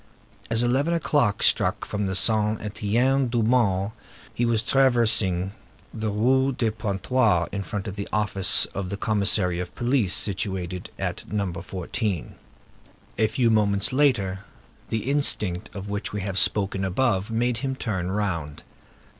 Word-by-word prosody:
As 115 Hz, +1 st, +1 dB
eleven 140 Hz, +8 st, +1 dB
o'clock 145 Hz, -10 st, +1 dB
struck -, -, +2 dB
from 100 Hz, -2 st, -2 dB
Saint 110 Hz, 0 st, +1 dB
Étienne 120 Hz, +6 st, +1 dB
du 120 Hz, -1 st, 0 dB
Mont, 105 Hz, -4 st, +2 dB, 0.4 s
he 120 Hz, -, 0 dB
was 115 Hz, -1 st, +1 dB
traversing 115 Hz, -8 st, +2 dB, 0.4 s
the 110 Hz, -1 st, -3 dB
Rue 130 Hz, +6 st, +2 dB
de 115 Hz, -3 st, 0 dB
Pontoise, 105 Hz, -3 st, +1 dB
in 100 Hz, -, -3 dB
front 100 Hz, 0 st, -5 dB
of 100 Hz, -, -5 dB
the 100 Hz, -1 st, -5 dB
office 100 Hz, -3 st, +4 dB
of 95 Hz, -2 st, -4 dB
the 100 Hz, -, -4 dB
commissary 100 Hz, -4 st, +1 dB
of 90 Hz, -1 st, -6 dB
police, 120 Hz, -6 st, +1 dB
situated 95 Hz, -3 st, -3 dB
at -, -, -5 dB
No. 100 Hz, -4 st, -1 dB
14. 90 Hz, +1 st, -4 dB, 0.9 s
A 110 Hz, -, +4 dB
few 115 Hz, +2 st, +1 dB
moments 105 Hz, +2 st, +2 dB
later, 120 Hz, -10 st, +2 dB, 0.5 s
the 110 Hz, +1 st, -2 dB
instinct 110 Hz, -9 st, +1 dB
of 100 Hz, 0 st, -6 dB
which 100 Hz, 0 st, -3 dB
we 105 Hz, -, -3 dB
have 95 Hz, 0 st, 0 dB
spoken 100 Hz, -2 st, +1 dB
above 100 Hz, +1 st, 0 dB
made 120 Hz, +1 st, 0 dB
him 135 Hz, +1 st, -3 dB
turn 95 Hz, -8 st, -3 dB
round. 90 Hz, -7 st, -3 dB
105 Hz, 145 wpm, -24 LUFS, 95-120 Hz, 0.9 s, office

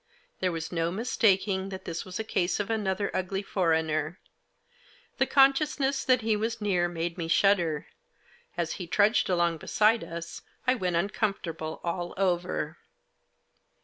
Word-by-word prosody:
There 185 Hz, -1 st, +1 dB
was 165 Hz, -1 st, -4 dB
no 165 Hz, -1 st, 0 dB
mistaking 195 Hz, -3 st, +1 dB
that 190 Hz, -1 st, -7 dB
this 165 Hz, -1 st, -4 dB
was 185 Hz, +1 st, -6 dB
a -, -, -1 dB
case 180 Hz, -4 st, 0 dB
of 205 Hz, +2 st, -2 dB
another 200 Hz, -2 st, -1 dB
ugly 190 Hz, +2 st, -2 dB
foreigner. 160 Hz, -3 st, 0 dB, 1.0 s
The -, -, +3 dB
consciousness 275 Hz, 0 st, +3 dB
that 255 Hz, -2 st, +3 dB
he 220 Hz, -1 st, +1 dB
was 225 Hz, +2 st, -2 dB
near 185 Hz, -5 st, +1 dB
made 170 Hz, +1 st, -4 dB
me 165 Hz, -, -2 dB
shudder; 170 Hz, -3 st, +2 dB, 0.7 s
as 170 Hz, -1 st, -1 dB
he 175 Hz, -, -5 dB
trudged 205 Hz, +5 st, +3 dB
along 170 Hz, -2 st, +2 dB
beside 215 Hz, +7 st, +2 dB
us 170 Hz, 0 st, -7 dB, 0.2 s
I 255 Hz, -, +4 dB
went 185 Hz, -8 st, -1 dB
uncomfortable 170 Hz, -4 st, -2 dB
all 175 Hz, 0 st, -3 dB
over. 175 Hz, -4 st, -1 dB
185 Hz, 145 wpm, -28 LUFS, 170-215 Hz, 1.0 s, I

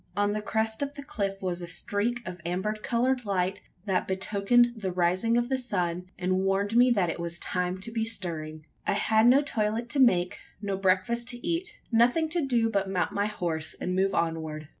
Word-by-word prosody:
On 205 Hz, 0 st, +2 dB
the 215 Hz, -, -2 dB
crest 220 Hz, +2 st, -1 dB
of 285 Hz, 0 st, -3 dB
the 285 Hz, -, -7 dB
cliff 195 Hz, -7 st, -3 dB
was 180 Hz, -1 st, -2 dB
a 175 Hz, -, -5 dB
streak 210 Hz, +6 st, -1 dB
of 180 Hz, -2 st, -7 dB
amber 185 Hz, +5 st, -1 dB
coloured 245 Hz, +4 st, 0 dB
light, 190 Hz, -2 st, -1 dB, 0.2 s
that 190 Hz, -3 st, 0 dB
betokened 200 Hz, +5 st, +3 dB
the 195 Hz, -4 st, -3 dB
rising 185 Hz, +6 st, +2 dB
of 240 Hz, 0 st, +1 dB
the 265 Hz, 0 st, 0 dB
sun 180 Hz, -7 st, -2 dB
and 185 Hz, 0 st, 0 dB
warned 195 Hz, +3 st, 0 dB
me 245 Hz, +1 st, +6 dB
that 195 Hz, -8 st, +2 dB
it -, -, -7 dB
was 170 Hz, 0 st, -3 dB
time 180 Hz, +1 st, -1 dB
to 230 Hz, -, -5 dB
be 225 Hz, -1 st, -1 dB
stirring. 155 Hz, -8 st, -3 dB, 0.2 s
I -, -, +3 dB
had 220 Hz, +2 st, +3 dB
no 270 Hz, +4 st, +6 dB
toilet 225 Hz, -2 st, -1 dB
to 275 Hz, -, -1 dB
make 185 Hz, -9 st, +3 dB, 0.2 s
no 200 Hz, -1 st, -2 dB
breakfast 195 Hz, +5 st, +1 dB
to 245 Hz, +4 st, -3 dB
eat: 340 Hz, +2 st, -1 dB, 0.2 s
nothing 245 Hz, +8 st, +3 dB
to 340 Hz, 0 st, 0 dB
do 240 Hz, -4 st, +2 dB
but 200 Hz, -3 st, 0 dB
mount 185 Hz, -2 st, 0 dB
my 200 Hz, +1 st, 0 dB
horse 165 Hz, -6 st, -3 dB
and 180 Hz, -, -2 dB
move 195 Hz, +1 st, +2 dB
onward. 160 Hz, -2 st, -2 dB
205 Hz, 205 wpm, -28 LUFS, 180-235 Hz, 0.2 s, me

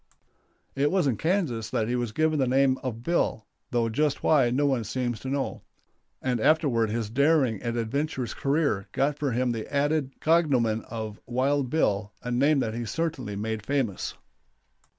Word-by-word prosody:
It 140 Hz, +2 st, +2 dB
was 185 Hz, -2 st, +2 dB
in 130 Hz, -5 st, +2 dB
Kansas 155 Hz, -, -1 dB
that 110 Hz, -, 0 dB
he 120 Hz, -, 0 dB
was 120 Hz, -3 st, -2 dB
given 155 Hz, +4 st, +1 dB
the 130 Hz, -, +2 dB
name 130 Hz, +1 st, +3 dB
of 120 Hz, -3 st, -5 dB
"Bill," 145 Hz, -8 st, 0 dB, 0.2 s
though 120 Hz, -2 st, +1 dB
just 145 Hz, +5 st, 0 dB
why 135 Hz, -6 st, +4 dB
no 135 Hz, +4 st, +1 dB
one 135 Hz, -5 st, +1 dB
seems 120 Hz, +1 st, -2 dB
to 130 Hz, -, -8 dB
know; 140 Hz, 0 st, -2 dB, 0.6 s
and 125 Hz, -2 st, 0 dB
afterward 125 Hz, -5 st, +3 dB
his 115 Hz, 0 st, -2 dB
daring 140 Hz, -4 st, +2 dB
and 120 Hz, 0 st, -2 dB
adventurous 130 Hz, +2 st, -2 dB
career 140 Hz, -8 st, 0 dB
got 145 Hz, +1 st, 0 dB
for 145 Hz, -3 st, 0 dB
him 125 Hz, +1 st, +1 dB
the 115 Hz, -2 st, -5 dB
added 145 Hz, -1 st, 0 dB
cognomen 135 Hz, -9 st, +2 dB
of 110 Hz, -2 st, -5 dB
"Wild 130 Hz, +2 st, +1 dB
Bill," 105 Hz, -8 st, 0 dB
a 125 Hz, -, -3 dB
name 140 Hz, +5 st, +3 dB
that 110 Hz, -3 st, -2 dB
he 120 Hz, +1 st, -3 dB
certainly 130 Hz, -4 st, -3 dB
made 110 Hz, +1 st, -3 dB
famous. 130 Hz, -6 st, -1 dB
130 Hz, 170 wpm, -27 LUFS, 115-145 Hz, 0.6 s, why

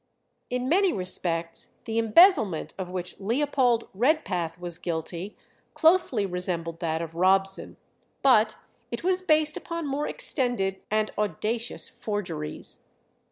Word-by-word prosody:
In 250 Hz, +1 st, -2 dB
many 370 Hz, +5 st, +3 dB
respects 170 Hz, -, -1 dB
the 225 Hz, 0 st, -1 dB
embezzlement 225 Hz, -, +4 dB
of 185 Hz, -1 st, -4 dB
which 180 Hz, -1 st, -5 dB
Leopold 245 Hz, +2 st, +1 dB
Redpath 190 Hz, -, 0 dB
was 175 Hz, -1 st, -5 dB
guilty 170 Hz, +3 st, -4 dB, 0.4 s
closely 320 Hz, -, +4 dB
resembled 175 Hz, -3 st, -3 dB
that 165 Hz, -1 st, -1 dB
of 165 Hz, -1 st, -7 dB
Robson, 195 Hz, +2 st, +1 dB, 0.5 s
but 220 Hz, -5 st, +5 dB, 0.3 s
it 235 Hz, -, -5 dB
was 370 Hz, +1 st, +2 dB
based 310 Hz, -4 st, +2 dB
upon 335 Hz, -2 st, -5 dB
more 285 Hz, +1 st, -2 dB
extended 245 Hz, -, -1 dB
and 215 Hz, 0 st, 0 dB
audacious 215 Hz, +4 st, -1 dB
forgeries. 175 Hz, -8 st, -4 dB
210 Hz, 115 wpm, -26 LUFS, 180-270 Hz, 0.5 s, but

